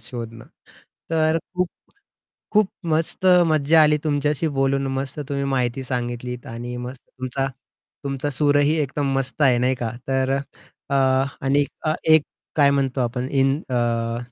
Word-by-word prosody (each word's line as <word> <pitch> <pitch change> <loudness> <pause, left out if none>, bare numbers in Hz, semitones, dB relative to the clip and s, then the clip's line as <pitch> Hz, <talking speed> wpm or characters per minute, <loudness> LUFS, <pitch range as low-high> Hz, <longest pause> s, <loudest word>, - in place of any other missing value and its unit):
शोधणं. 115 -2 -8 0.7
तर 160 0 +2 0.2
खूप 180 0 +1 0.8
खूप 215 -1 +4 0.2
मस्त 160 +4 0 0.2
मज्जा 155 0 +4
आली 150 0 +5
तुमच्याशी 150 +1 0
बोलून. 135 0 +2
मस्त 135 +2 -4
तुम्ही 140 -1 -1
माहिती 130 -1 0
सांगितली 125 -1 -3
आणि 120 +1 -6
मस्त 130 +1 -9
तुमचा 130 +1 -3 0.6
तुमचा 140 +1 -2
सूरही 145 +1 +3
एकदम 145 0 -1
मस्त 135 +2 -2
आहे 125 -3 +5
नाही 125 +2 +2
का. 120 -3 -3 0.2
तर 135 0 +1 0.5
अ, - - +1
आणि 135 +1 +2 0.5
एक 160 -1 +7 0.3
काय 145 -2 +5
म्हणतो 135 -1 0
आपण 125 +1 -1
इन 135 +2 +2
अ, 115 -1 0
135 Hz, 135 wpm, -22 LUFS, 125-145 Hz, 0.8 s, एक